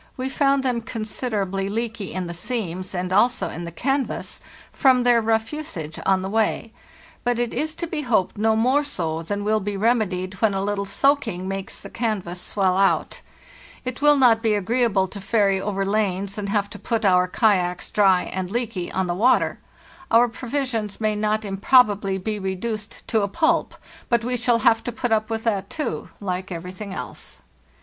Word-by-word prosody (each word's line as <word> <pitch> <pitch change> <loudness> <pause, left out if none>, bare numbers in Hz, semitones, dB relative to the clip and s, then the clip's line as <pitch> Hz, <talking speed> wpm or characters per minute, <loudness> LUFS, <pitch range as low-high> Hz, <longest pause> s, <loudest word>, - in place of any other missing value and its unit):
NORTLTTT - - -35
we 260 +1 -2
found 275 0 +2
them 245 -3 0
considerably 215 -4 -3
leaky 225 -2 -3
in 185 -1 -3
the 170 - -5
seams 185 -2 -4
and 180 +1 -2
also 235 +6 +3
in 170 - -6
the 170 - -6
canvas, 270 - -2 0.3
from 260 -3 +4
their 240 -1 +4
rough 225 +2 0
usage 180 - -6
on 190 -1 +3
the 190 - -3
way, 220 +1 0 0.5
but 245 -1 +1
it 240 -1 -1
is 310 +5 -2
to 340 - -3
be 320 -2 -3
hoped 225 -9 +1
no 220 +1 +2
more 255 +6 +3
so 165 - -3
than 205 +5 -3
will 215 +1 +2
be 205 0 -3
remedied 200 -4 +1
when 215 -3 +3
a 195 - -1
little 200 0 -1
soaking 225 -7 +1
makes 195 0 -4
the - - -9
canvas 200 -7 -2
swell 190 -2 0
out. 195 0 +1 0.6
It 255 +1 -4
will 295 0 +6
not 235 -4 +5
be 220 -2 +2
agreeable 205 -1 +1
to 200 +2 -9
ferry 200 -2 +2
over 195 -1 -1
lanes 200 -1 -1
and 205 -1 -4
have 200 -1 +1
to - - -9
put 225 -2 -1
our 180 -1 +4
kayaks 180 -4 +1
dry 195 -3 +4
and 185 -1 -4
leaky 205 -5 -3
on 190 - 0
the 175 - -1
water. 230 +8 +2 0.5
Our 235 +1 +5
provisions 235 -3 -3
may 215 -1 +1
not 215 +1 0
improbably 200 -1 +3
be 210 +2 -3
reduced 205 +3 -4
to 220 - +2
a 200 - +1
pulp; 320 - +1 0.3
but 235 -1 +2
we 250 +1 -1
shall 240 0 +2
have 225 0 +4
to 245 - -2
put 240 +1 -3
up 220 0 +2
with 225 0 -2
that, 205 -4 -1
too, 305 - -4
like 185 -1 -4
everything 180 +4 -6
else. - - -7
215 Hz, 190 wpm, -23 LUFS, 190-240 Hz, 0.6 s, will